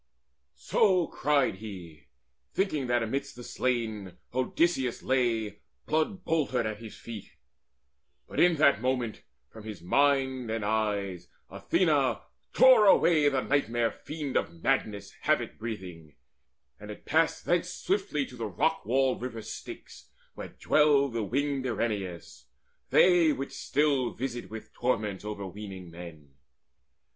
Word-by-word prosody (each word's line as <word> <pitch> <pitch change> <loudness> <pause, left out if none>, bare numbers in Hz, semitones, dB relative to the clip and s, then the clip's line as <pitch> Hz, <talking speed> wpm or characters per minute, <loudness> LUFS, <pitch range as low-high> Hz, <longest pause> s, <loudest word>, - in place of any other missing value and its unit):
So 185 -5 +2
cried 140 -10 +1
he, 90 -7 -10 0.5
thinking 155 -9 0
that 120 -1 +2
amidst 135 +5 -3
the 120 - -9
slain 110 -8 -2 0.2
Odysseus 130 0 0
lay 115 -5 0 0.3
blood 160 +5 -1
boltered 140 -7 0
at 110 -1 -4
his 115 -2 -10
feet. 115 -4 -9 0.9
But - - -5
in 175 -1 +5
that 140 -7 +4
moment 125 -3 -1 0.3
from 110 - -11
his 105 -5 -8
mind 130 +2 +2
and 110 -2 -2
eyes 100 -4 -1 0.2
Athena - - +1 0.3
tore 255 -5 +7
away 155 -6 +5
the 135 -2 0
nightmare 120 -5 +1
fiend 150 -4 -4
Of 85 -1 -4
Madness 105 -2 0
havoc - - 0
breathing, 90 -9 -7 0.6
and 105 - -10
it 105 - -9
passed 160 +2 +1
Thence 175 +1 +1
swiftly 185 -7 -1
to 125 - -12
the 115 -2 -4
rock 90 - 0
walled 130 +3 +1
river 115 -3 -5
Styx - - -10 0.2
Where - - -7
dwell 145 -2 +3
the 115 -2 -3
winged 135 +4 -1
Erinnyes, 100 -8 -4 0.4
they 175 -3 +5
which 135 0 -5
still 140 -3 0
Visit 120 -1 -4
with 110 0 -9
torments 110 -6 -1
overweening 100 -3 -7
men. 80 -5 -11
120 Hz, 130 wpm, -28 LUFS, 105-145 Hz, 0.9 s, tore